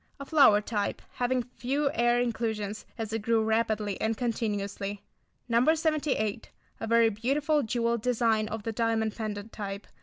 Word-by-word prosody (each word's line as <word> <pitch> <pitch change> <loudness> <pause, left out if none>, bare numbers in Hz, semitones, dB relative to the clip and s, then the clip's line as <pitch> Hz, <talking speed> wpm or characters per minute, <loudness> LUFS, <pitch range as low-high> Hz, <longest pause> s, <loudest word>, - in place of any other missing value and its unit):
A 275 - -6
flower 275 -9 +6
type, 210 -1 -2
having 250 0 0
few 270 +4 -1
air 240 0 +3
inclusions, 220 -3 -2
as 220 -1 -4
it 225 - -1
grew 225 +1 +2
rapidly 220 -2 0
and 220 0 0
continuously. 205 -4 -2 0.4
No. 245 +7 +4
78. 300 -9 -1 0.3
A - - -4
very 230 0 +5
beautiful 280 +8 +1
jewelled 235 -1 0
design 225 -3 +2
of 220 0 -5
the 225 - -2
diamond 225 -1 0
pendant 215 -1 -5
type. 200 -1 -6
225 Hz, 150 wpm, -28 LUFS, 215-245 Hz, 0.4 s, flower